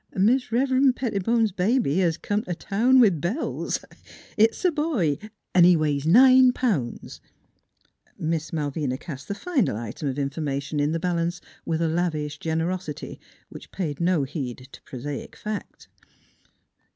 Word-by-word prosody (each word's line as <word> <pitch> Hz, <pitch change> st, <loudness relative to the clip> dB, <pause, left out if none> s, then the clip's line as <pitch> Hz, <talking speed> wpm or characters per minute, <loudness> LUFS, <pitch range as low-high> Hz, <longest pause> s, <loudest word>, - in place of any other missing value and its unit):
Mis' 235 Hz, +7 st, +2 dB
Rev'ren' 260 Hz, +2 st, +3 dB
Pettibone's 225 Hz, -2 st, 0 dB
baby 190 Hz, -, +1 dB
hes 170 Hz, -3 st, +1 dB
come 205 Hz, +3 st, -1 dB
t' 180 Hz, -5 st, -5 dB
town 240 Hz, +9 st, +3 dB
with 195 Hz, -, +4 dB
bells! 210 Hz, -, -2 dB, 0.5 s
It's 225 Hz, -, +2 dB
a 360 Hz, -, +5 dB
boy, 295 Hz, -, 0 dB, 0.3 s
an' 180 Hz, -, +6 dB
he 175 Hz, 0 st, +7 dB
weighs 150 Hz, -1 st, 0 dB
nine 255 Hz, +6 st, +7 dB
pounds! 180 Hz, -, -2 dB, 0.5 s
" -, -, -42 dB, 0.2 s
Miss 160 Hz, -1 st, -2 dB
Malvina 145 Hz, -4 st, -2 dB
cast 140 Hz, -3 st, -9 dB
the 200 Hz, -, -3 dB
final 265 Hz, -, 0 dB
item 115 Hz, +6 st, -5 dB
of 135 Hz, -, -2 dB
informa 140 Hz, 0 st, -2 dB
tion 145 Hz, +2 st, -4 dB
in 145 Hz, +1 st, +1 dB
the 165 Hz, -, -1 dB
balance 175 Hz, 0 st, -1 dB, 0.3 s
with 165 Hz, 0 st, -1 dB
a -, -, +2 dB
lavish 155 Hz, -3 st, -2 dB
generosity 165 Hz, 0 st, -3 dB, 0.3 s
which -, -, -11 dB
paid 160 Hz, -5 st, -4 dB
no 170 Hz, -4 st, +2 dB
heed 130 Hz, -2 st, -6 dB
to -, -, -13 dB
prosaic 140 Hz, +2 st, -7 dB
fact. 215 Hz, -1 st, -7 dB
170 Hz, 150 wpm, -25 LUFS, 150-225 Hz, 0.5 s, he